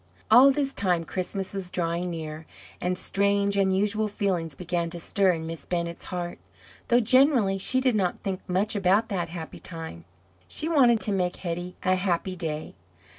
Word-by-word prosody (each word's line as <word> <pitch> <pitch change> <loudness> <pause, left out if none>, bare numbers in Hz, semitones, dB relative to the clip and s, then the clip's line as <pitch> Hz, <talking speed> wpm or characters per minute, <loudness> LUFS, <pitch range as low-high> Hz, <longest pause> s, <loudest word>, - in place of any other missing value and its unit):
All 250 +5 +9
this 275 0 -1
time 180 -4 +2
Christmas 190 +3 -4
was 195 -2 -5
drawing 175 0 -2
near, 160 -1 -6 0.3
and 180 0 -1
strange, 200 +1 +1
unusual 200 +2 +2
feelings 185 -7 -2
began 170 0 -2
to 170 +1 -7
stir 190 +2 +2
in 160 -1 -5
Miss 165 0 -6
Bennett's 170 -1 -3
heart, 175 -1 -5 0.5
though 240 - +4
generally 245 -5 +4
she 260 +7 +2
did 255 -3 +2
not 185 -4 0
think 190 -2 -4
much 200 +5 +1
about 200 +3 +2
that 175 -4 -2
happy 165 -1 -7
time. 160 - -8 0.4
She 310 - -2
wanted 255 -8 +4
to 210 - +1
make 180 -2 0
Hetty 175 0 -5
a 185 - +3
happy 185 0 -1
day. 160 -3 -4
185 Hz, 170 wpm, -26 LUFS, 170-205 Hz, 0.5 s, All